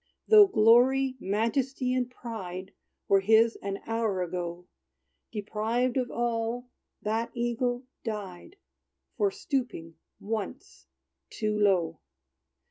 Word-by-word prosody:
Though 425 -2 +9
glory, 255 - +4
majesty, 250 +6 0
and 250 -1 0
pride 195 -7 -7 0.3
Were 195 - +5
his 220 +3 +4
an 195 0 -4
hour 225 -5 0
ago, 175 0 -5 0.7
Deprived 225 +4 -1
of 255 -2 0
all, 235 +1 -2 0.3
that 225 +2 -1
eagle 245 +1 -1 0.2
died, 210 - -6 0.6
For 205 -4 +3
stooping 195 - -4 0.2
once 205 - -5 0.4
too 215 -1 -2
low! 185 -6 +2
225 Hz, 100 wpm, -28 LUFS, 195-245 Hz, 0.7 s, Though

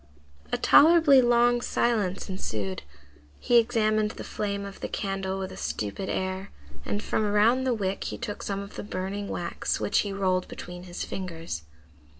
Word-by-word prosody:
A - - +1
tolerably 310 -4 +7
long 240 0 +4
silence 210 -7 0
ensued. 105 - -3 0.6
He 240 - +5
examined 215 -2 +2
the - - -8
flame 200 -1 -3
of 200 -1 -9
the - - -3
candle 195 -1 -3
with 190 0 -4
a - - -9
stupid 110 - -3
air, 190 +1 -2 0.3
and 205 - -3
from 220 - 0
around 215 +5 +3
the 255 - +2
wick 195 -2 -2
he - - -4
took 205 - -5
some 200 -1 -3
of 200 +1 -10
the - - -4
burning 200 +1 -4
wax, 175 -3 -2
which 205 - +2
he 205 - -1
rolled 185 -2 0
between 180 0 -8
his 175 -1 -5
fingers. 165 - -5
200 Hz, 165 wpm, -27 LUFS, 185-220 Hz, 0.6 s, tolerably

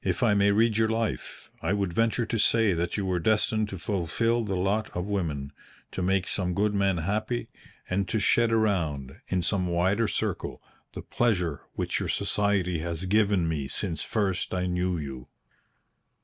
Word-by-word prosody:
"If - - 0
I 110 -3 +4
may 100 0 +4
read 110 +2 +3
your 110 0 +3
life, 115 -1 -3
I 80 - 0
would 100 -4 -1
venture 115 +3 +1
to 115 0 -2
say 110 0 +4
that 85 +3 -1
you 100 - -1
were 90 -2 0
destined 110 +2 +1
to 95 - -6
fulfil 110 +6 0
the 100 -3 -2
lot 100 +4 0
of 90 - -2
women 80 -9 -2 0.4
to - - -4
make 95 +1 +1
some 90 -2 -1
good 105 +2 +1
man 100 -2 +2
happy, 110 +8 -2 0.4
and 95 +1 0
to 110 - -1
shed 115 +3 +3
around, 80 - 0
in 90 -2 0
some 90 +1 0
wider 95 +6 +2
circle, - - -2 0.3
the - - -7
pleasure 90 -11 0
which - - -1
your - - -3
society 100 -4 +1
has 85 +2 -3
given 100 -3 +2
me 75 -4 -2
since 80 -1 -2
first 95 -4 -1
I 90 0 0
knew 90 0 0
you." 65 -5 -6
95 Hz, 175 wpm, -27 LUFS, 90-110 Hz, 0.4 s, I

